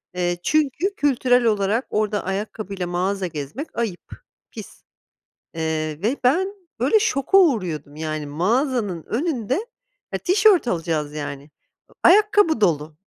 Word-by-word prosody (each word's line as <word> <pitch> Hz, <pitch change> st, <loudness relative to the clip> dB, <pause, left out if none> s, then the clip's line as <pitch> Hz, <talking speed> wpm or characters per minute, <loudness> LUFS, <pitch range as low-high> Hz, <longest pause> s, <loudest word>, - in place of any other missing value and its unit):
Eee, 175 Hz, -1 st, -1 dB
çünkü 310 Hz, +6 st, +1 dB
kültürel 250 Hz, -3 st, +2 dB
olarak 215 Hz, +2 st, +1 dB
orada 210 Hz, -1 st, -1 dB
ayakkabıyla 195 Hz, -1 st, -4 dB
mağaza 185 Hz, +2 st, -1 dB
gezmek 155 Hz, -, -7 dB
ayıp, 215 Hz, -7 st, -4 dB, 0.4 s
pis. -, -, -11 dB, 0.7 s
Eee, 155 Hz, -1 st, -2 dB
ve 245 Hz, +6 st, +1 dB
ben 370 Hz, +10 st, +2 dB, 0.3 s
böyle 440 Hz, -, +3 dB
şoka 390 Hz, -, +2 dB
uğruyordum 180 Hz, -, 0 dB
yani, 155 Hz, -1 st, -4 dB
mağazanın 205 Hz, -, 0 dB
önünde 265 Hz, -, -2 dB, 0.5 s
e, -, -, -1 dB
tişört 385 Hz, -, +4 dB
alacağız 160 Hz, -5 st, -2 dB
yani. 145 Hz, -2 st, -5 dB
Iıı, 150 Hz, -, -27 dB
ayakkabı 415 Hz, -, +5 dB
dolu. 155 Hz, -5 st, +1 dB
210 Hz, 120 wpm, -22 LUFS, -, 0.7 s, ayakkabı